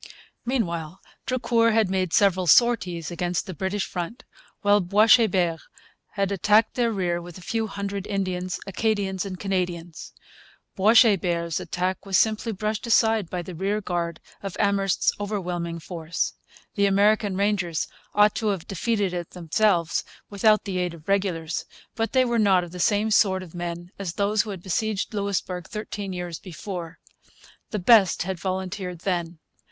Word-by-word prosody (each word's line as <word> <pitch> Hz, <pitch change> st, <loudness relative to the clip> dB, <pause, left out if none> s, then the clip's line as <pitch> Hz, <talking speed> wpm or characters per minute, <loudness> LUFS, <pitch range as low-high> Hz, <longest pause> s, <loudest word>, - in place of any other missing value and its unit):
Meanwhile 175 Hz, -9 st, -2 dB, 0.3 s
Drucour 235 Hz, -3 st, +2 dB
had 220 Hz, -4 st, +2 dB
made 185 Hz, -3 st, 0 dB
several 185 Hz, -2 st, +3 dB
sorties 180 Hz, -5 st, +3 dB
against 175 Hz, 0 st, -2 dB
the 185 Hz, -, -6 dB
British 190 Hz, +4 st, -2 dB
front, 180 Hz, +7 st, -5 dB, 0.4 s
while 205 Hz, 0 st, +5 dB
Boishebert 190 Hz, -3 st, +4 dB, 0.5 s
had 200 Hz, -1 st, 0 dB
attacked 210 Hz, +3 st, +3 dB
their 235 Hz, -2 st, +1 dB
rear 175 Hz, -4 st, -1 dB
with 175 Hz, 0 st, -10 dB
a -, -, -12 dB
few 225 Hz, +2 st, -1 dB
hundred 200 Hz, -1 st, -4 dB
Indians, 185 Hz, -2 st, -2 dB
Acadians, 195 Hz, -1 st, -1 dB
and 185 Hz, -1 st, -7 dB
Canadians. 175 Hz, -4 st, -3 dB, 0.6 s
Boishebert's 190 Hz, -, +4 dB
attack 185 Hz, +1 st, -2 dB
was 195 Hz, -2 st, +1 dB
simply 220 Hz, +1 st, +1 dB
brushed 215 Hz, +2 st, -3 dB
aside 225 Hz, -5 st, +3 dB
by 180 Hz, -1 st, -3 dB
the 180 Hz, -, -8 dB
rearguard 175 Hz, -3 st, -2 dB, 0.2 s
of 195 Hz, -2 st, -6 dB
Amherst's 200 Hz, -2 st, +2 dB
overwhelming 180 Hz, -5 st, -3 dB
force. 165 Hz, 0 st, -3 dB, 0.4 s
The 200 Hz, -1 st, +2 dB
American 200 Hz, 0 st, +3 dB
Rangers 195 Hz, -5 st, 0 dB, 0.3 s
ought 210 Hz, 0 st, +5 dB
to 220 Hz, -, -1 dB
have 195 Hz, -5 st, -2 dB
defeated 200 Hz, 0 st, -1 dB
it 175 Hz, -2 st, -4 dB
themselves, 175 Hz, 0 st, +1 dB, 0.3 s
without 215 Hz, +1 st, +3 dB
the 190 Hz, -3 st, -3 dB
aid 180 Hz, -1 st, -2 dB
of 160 Hz, -2 st, -17 dB
regulars. 180 Hz, -5 st, 0 dB, 0.3 s
But 225 Hz, 0 st, -2 dB
they 260 Hz, -1 st, +4 dB
were 235 Hz, -1 st, +1 dB
not 190 Hz, -4 st, +3 dB
the 180 Hz, -, -8 dB
same 210 Hz, +3 st, +2 dB
sort 190 Hz, -2 st, +3 dB
of 170 Hz, -, -13 dB
men 175 Hz, 0 st, -5 dB
as 185 Hz, -4 st, -4 dB
those 205 Hz, +2 st, +2 dB
who 220 Hz, -, -7 dB
had 190 Hz, -4 st, -7 dB
besieged 210 Hz, +3 st, -1 dB
Louisbourg 200 Hz, -3 st, -2 dB
thirteen 210 Hz, -2 st, -5 dB
years 175 Hz, -2 st, -5 dB
before. 180 Hz, -1 st, -7 dB, 0.7 s
The 215 Hz, -, -2 dB
best 195 Hz, -2 st, +5 dB
had 185 Hz, 0 st, -4 dB
volunteered 185 Hz, -1 st, -4 dB
then. 175 Hz, -3 st, -2 dB
190 Hz, 150 wpm, -25 LUFS, 175-210 Hz, 0.7 s, while